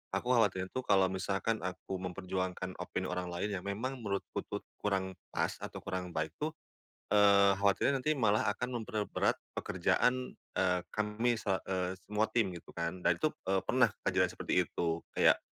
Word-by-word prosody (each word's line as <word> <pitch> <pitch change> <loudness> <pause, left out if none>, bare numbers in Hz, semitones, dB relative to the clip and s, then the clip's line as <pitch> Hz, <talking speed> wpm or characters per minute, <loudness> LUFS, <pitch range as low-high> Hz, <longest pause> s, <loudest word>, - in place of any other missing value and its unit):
aku 125 - 0
khawatirnya 95 -6 +2
tuh 130 - -3
kalau 95 -1 +5
misalkan 100 +4 -1
aku 95 +1 -4
memperjuangkan 95 0 -3
opini - - -3
orang 90 0 -2
lain 90 +4 -2
yang - - -13
memang 125 +7 -3
menurutku 100 -4 -3
tuh - - -4 0.2
kurang 95 -2 -1 0.2
pas - - +1
atau - - -6
kurang 90 -2 -4
baik 80 0 -1
tuh, 155 +1 -2 0.6
eee, 100 -1 +6
khawatirnya 100 +7 +2
nanti 155 +3 +2
malah 110 -3 +3
akan 125 +1 -3
memperberat 105 -1 0 0.2
pekerjaan, 125 0 +1 0.2
eee, 90 -1 +3
kami 110 +3 0
sela 95 -3 -1
eee, 95 -1 -1
semua 105 +1 +1
tim 115 -5 +3
gitu - - -16
kan. 85 +2 -2
Dan - - +6
itu, 155 - +4 0.2
eee, 95 0 +2
pernah 125 +5 +4 0.2
kejadian - - +2
seperti - - +1
itu. 85 -1 -1 0.2
Kayak - - +5
100 Hz, 165 wpm, -33 LUFS, 95-110 Hz, 0.6 s, eee